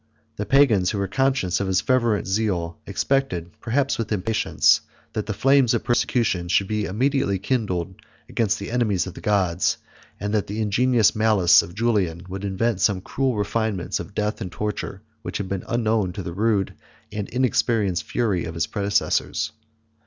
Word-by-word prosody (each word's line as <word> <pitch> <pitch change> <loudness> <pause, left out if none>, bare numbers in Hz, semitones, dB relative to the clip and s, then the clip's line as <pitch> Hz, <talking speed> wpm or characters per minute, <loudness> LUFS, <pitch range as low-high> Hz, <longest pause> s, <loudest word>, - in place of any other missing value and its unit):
The 105 - -3
pagans, 110 -9 +4
who 105 - -2
were 100 -1 -1
conscious 125 -4 +1
of 100 - -1
his 95 0 +2
fervent 120 -5 +1
zeal, 95 -5 -1
expected, 110 -12 -1
perhaps 135 +3 0
with 115 -1 -3
impatience, 110 +2 +2 0.3
that 105 -1 -3
the - - -1
flames 135 -2 +4
of 115 - -2
persecution 115 -7 +1
should 95 +2 +2
be 105 0 -1
immediately 130 0 +1
kindled 95 -4 -1 0.3
against 105 -2 0
the 100 +1 -6
enemies 110 -7 +1
of 95 - -7
the - - -11
gods; 95 -4 +1 0.4
and 105 +1 -3
that 105 -2 0
the 105 +2 -4
ingenious 115 +1 +3
malice 110 -3 +5
of 85 - -10
Julian 100 -7 0
would 95 +1 -6
invent 100 +1 -1
some 100 -3 +3
cruel 130 +4 -1
refinements 105 -2 -1
of 85 +4 -8
death 105 +1 -1
and 90 -4 -4
torture 105 -1 -4 0.2
which - - -4
had 100 - -4
been 95 -1 -3
unknown 110 -5 0
to 95 - -5
the 85 - -5
rude 105 0 +1 0.4
and 105 -1 -4
inexperienced 115 -6 +1
fury 105 -8 -1
of 85 0 -6
his 80 -3 0
predecessors. 100 0 0
105 Hz, 170 wpm, -23 LUFS, 95-115 Hz, 0.4 s, malice